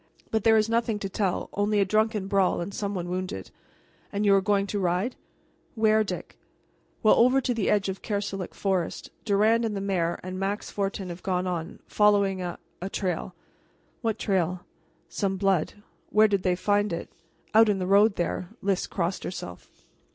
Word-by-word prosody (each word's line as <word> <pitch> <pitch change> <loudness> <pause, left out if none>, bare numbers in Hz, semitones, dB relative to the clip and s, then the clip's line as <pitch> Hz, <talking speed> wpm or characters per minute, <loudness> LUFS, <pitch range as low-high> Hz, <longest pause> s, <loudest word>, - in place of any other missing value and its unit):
"But 220 -2 0
there 225 0 +6
is 215 0 +3
nothing 230 -1 +1
to 200 -1 -4
tell 190 -2 -1
only 205 +1 +1
a 200 - +4
drunken 215 0 +1
brawl, 195 -2 +2
and 175 +3 -4
some 200 0 -3
one 175 -1 -3
wounded." 180 - -4 0.6
"And 205 +1 -1
you 200 - +6
are 195 - +5
going 200 +1 +2
to 205 0 -3
ride 185 +6 0 0.6
where, 220 -1 +4
Dick?" 210 - -6 0.6
"Well, 215 - +7
over 255 +3 +5
to 255 -1 0
the 225 -4 0
edge 205 -1 +2
of 190 0 -4
Kerselec 200 -3 -3
forest. 190 -4 -2
Durand 220 +2 +3
and 215 -3 -1
the - - -1
mayor, 185 -4 -1
and 185 0 -5
Max 200 +2 -2
Fortin, 195 -2 -3
have 175 +1 -7
gone 185 -1 -1
on, 175 0 -4
following 200 -2 +3
a 175 -1 -4 0.2
a 190 - -3
trail." 185 -2 -3 0.7
"What 225 -3 -1
trail?" 180 -2 0 0.5
"Some 195 -2 -2
blood." 190 -4 +1 0.4
"Where 215 +1 +5
did 200 -2 +1
they 180 -1 +1
find 205 +2 +1
it?" 170 - -4 0.5
"Out 220 0 +6
in 205 - +2
the 185 - -2
road 200 +2 +5
there." 175 +1 -2
Lys 195 -1 0
crossed 175 0 -2
herself. 90 - -7
195 Hz, 180 wpm, -26 LUFS, 185-210 Hz, 0.7 s, Well